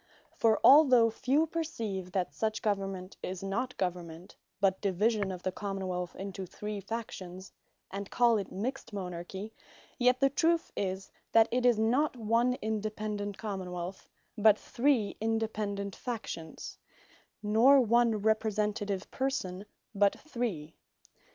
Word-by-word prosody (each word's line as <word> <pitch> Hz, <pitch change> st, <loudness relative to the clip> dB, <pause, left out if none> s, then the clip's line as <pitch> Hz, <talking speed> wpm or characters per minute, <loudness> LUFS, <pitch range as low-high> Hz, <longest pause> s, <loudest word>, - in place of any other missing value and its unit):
For 220 Hz, -1 st, +3 dB
although 260 Hz, -5 st, +7 dB
few 270 Hz, +7 st, +2 dB
perceive, 230 Hz, -, -4 dB
that 185 Hz, -3 st, -1 dB
such 220 Hz, -1 st, -2 dB
government, 195 Hz, -3 st, -2 dB
is 185 Hz, 0 st, -5 dB
not 240 Hz, +7 st, -2 dB
government, 175 Hz, -2 st, -4 dB, 0.2 s
but 195 Hz, -1 st, +2 dB
division 205 Hz, +1 st, +1 dB
of 180 Hz, -1 st, -7 dB
the 185 Hz, -, 0 dB
Common 195 Hz, -1 st, -4 dB
wealth 180 Hz, -1 st, -3 dB
into 195 Hz, -1 st, -6 dB
three 210 Hz, +2 st, -5 dB
Factions, 190 Hz, -3 st, -6 dB, 0.4 s
and 195 Hz, +1 st, -5 dB
call 235 Hz, -3 st, +4 dB
it 195 Hz, -, -6 dB
mixt 235 Hz, +4 st, -4 dB
Monarchy; 190 Hz, +2 st, -6 dB, 0.5 s
yet 250 Hz, +1 st, +4 dB
the 275 Hz, 0 st, +3 dB
truth 330 Hz, +4 st, +1 dB
is, 190 Hz, -1 st, -3 dB, 0.2 s
that 225 Hz, 0 st, +7 dB
it 250 Hz, +1 st, +2 dB
is 240 Hz, -3 st, +4 dB
not 250 Hz, +6 st, +2 dB
one 230 Hz, +3 st, +2 dB
independent 210 Hz, -1 st, -3 dB
Common 190 Hz, -4 st, -5 dB
wealth, 180 Hz, +2 st, -6 dB, 0.3 s
but 215 Hz, -1 st, +5 dB
three 240 Hz, -5 st, +1 dB
independent 215 Hz, -3 st, -2 dB
Factions; 220 Hz, -9 st, -6 dB, 0.6 s
nor 230 Hz, +7 st, +6 dB
one 235 Hz, -1 st, +3 dB
Representative 210 Hz, -2 st, 0 dB
Person, 205 Hz, -8 st, -2 dB, 0.3 s
but 200 Hz, -1 st, +3 dB
three. 225 Hz, -, -4 dB
210 Hz, 130 wpm, -31 LUFS, 190-235 Hz, 0.6 s, although